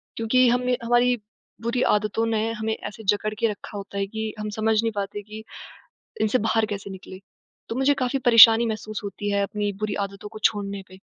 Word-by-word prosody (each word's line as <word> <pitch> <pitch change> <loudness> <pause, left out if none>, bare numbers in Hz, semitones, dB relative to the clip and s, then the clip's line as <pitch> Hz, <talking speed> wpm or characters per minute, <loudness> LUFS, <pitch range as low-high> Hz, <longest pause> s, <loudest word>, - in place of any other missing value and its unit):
क्योंकि 250 +3 +3
हमें 250 +1 +1
हमारी 240 +1 +3 0.5
बुरी 235 +2 -1 0.2
आदतों 215 +2 -1
ने 225 0 0
हमें 220 0 -2
ऐसे 220 0 -9
जकड़ 205 +2 0
के 230 - +3
रखा 205 0 -7
होता 200 0 -7
है 195 - 0
कि 220 +1 -4
हम 210 - -3
समझ 220 0 +2
नहीं 225 0 -1
पाते 200 +1 -4
कि 215 +1 -10 0.8
इनसे 220 +3 +2
बाहर 225 0 +2
कैसे 200 -2 -6
निकलें। 190 0 -10 0.5
तो 225 - -3
मुझे 270 +3 +3
काफ़ी 265 +2 -1
परेशानी 230 -1 +8
महसूस 215 -1 -4
होती 205 +1 -4
है 200 0 +1
अपनी 205 0 -2
बुरी 215 -1 -2 0.2
आदतों 200 +1 -11
को 215 - -10
छोड़ने 200 -2 0
पे। 185 - -14
215 Hz, 195 wpm, -24 LUFS, 205-230 Hz, 0.8 s, परेशानी